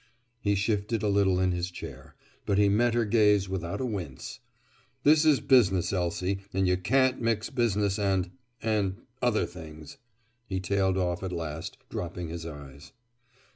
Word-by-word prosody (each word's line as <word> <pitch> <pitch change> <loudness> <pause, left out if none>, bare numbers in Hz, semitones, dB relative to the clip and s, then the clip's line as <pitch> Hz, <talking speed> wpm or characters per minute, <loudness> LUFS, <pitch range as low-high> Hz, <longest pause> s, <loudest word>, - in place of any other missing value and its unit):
He 100 -3 +1
shifted 105 +2 0
a - - +2
little 100 -2 +3
in 95 0 +2
his 90 0 -2
chair. 90 - -10 0.3
But 100 - +2
he 100 0 +5
met 115 +3 +2
her 120 -1 +2
gaze 105 -2 +4
without 85 -3 -3
a 130 - -1
wince. 90 - -5 0.6
"This 155 +1 +5
is 150 -3 +4
business, 100 -9 +3
Elsie, 90 +1 -1
and 95 0 +1
you 90 - +3
can't 125 +8 +2
mix 115 +1 0
business 105 -5 +1
and—and 100 +1 -1 0.3
other 120 -3 +2
things," 80 -3 -11 0.5
he 95 -1 -2
tailed 95 0 +1
off 90 -2 -1
at 95 -1 -4
last, 80 -2 -5
dropping 85 -1 -5
his 85 0 -6
eyes. 70 -2 -11
95 Hz, 155 wpm, -28 LUFS, 90-110 Hz, 0.6 s, he